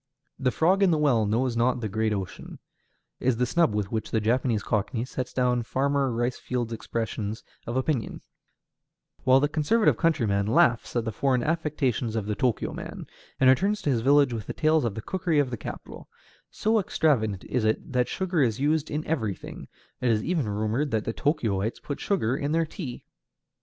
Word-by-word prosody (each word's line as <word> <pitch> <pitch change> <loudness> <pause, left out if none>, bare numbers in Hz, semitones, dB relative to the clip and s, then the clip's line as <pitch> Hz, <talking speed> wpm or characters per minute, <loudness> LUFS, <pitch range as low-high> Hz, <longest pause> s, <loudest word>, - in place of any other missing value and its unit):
"The 130 -1 +2
frog 180 +9 +2
in 195 - +5
the 160 - +3
well 125 -8 +2
knows 120 +3 0
not 125 +2 +2
the 110 - -2
great 110 +2 0
ocean," 100 -3 -5 0.6
is 125 -2 +1
the 125 - +2
snub 165 -5 +2
with 105 -2 -2
which 110 -2 -2
the 110 - +1
Japanese 115 0 +1
cockney 110 +3 -1
sets 130 -1 -5
down 125 -1 +1
Farmer 135 +2 0
Rice 120 +2 -1
Field's 120 -2 -3
expressions 110 -1 -4 0.2
of 120 +2 -2
opinion; 130 -3 -1 1.0
while 130 +1 +6
the 145 - +2
conservative 160 +9 +2
countryman 115 - +1
laughs 120 +2 +2
at 120 -1 0
the 115 - -2
foreign 130 +2 +1
affectations 140 -8 -1
of 110 -3 -1
the 105 0 -2
Tōkyō 125 -3 0
man, - - -7 0.3
and 130 - +4
returns 195 +11 +3
to 145 - +1
his 120 -3 +1
village 140 0 +4
with 110 -4 -5
tales 155 -3 +2
of 110 -4 -2
the 110 - -6
cookery 185 -4 -1
of 140 -3 +2
the - - -1
capital: - - -8 0.4
so 220 +1 +1
extravagant 115 - +1
is 125 - -1
it 110 +4 0
that 125 -1 +2
sugar 185 -4 -1
is 115 -4 +1
used 150 +2 +1
in 150 +1 -3
everything; 110 - -3 0.3
it 125 - +1
is 110 -2 +2
even 160 -9 0
rumored 110 +8 -1
that 110 -4 -1
the 115 - -2
Tōkyōites 115 - -1
put 145 - -5
sugar 135 - 0
in 145 +2 -2
their 165 0 +2
tea. 150 -5 -7
125 Hz, 190 wpm, -26 LUFS, 110-150 Hz, 1.0 s, while